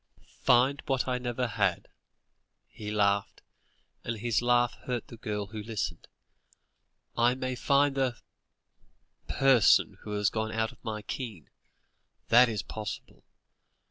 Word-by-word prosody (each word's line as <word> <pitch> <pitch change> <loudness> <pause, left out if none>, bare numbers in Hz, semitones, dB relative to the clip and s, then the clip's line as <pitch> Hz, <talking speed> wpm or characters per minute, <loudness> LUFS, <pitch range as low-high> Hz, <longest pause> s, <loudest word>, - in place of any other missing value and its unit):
"Find 130 +4 +4
what 135 -2 0
I 130 - 0
have 125 - -2
never 125 0 -2
had?" 100 -6 0 0.8
he 105 -1 -8
laughed, 100 -1 0 0.6
and 115 -1 -3
his 115 +1 0
laugh 120 0 +3
hurt 125 -3 -3
the - - -9
girl 105 -2 -3
who 105 +2 -7
listened. 105 -6 -4 1.1
"I 120 +1 +3
may 130 0 -3
find 140 +3 +2
the 130 -3 -1 1.1
person 135 -6 +4
who 105 - -6
has 105 0 +1
gone 110 0 -2
out 110 0 -1
of - - -21
my 110 -3 -4
ken; 110 - -6 0.8
that 120 +1 +7
is 105 -3 -3
possible. 110 -1 -7
115 Hz, 135 wpm, -29 LUFS, 105-125 Hz, 1.1 s, that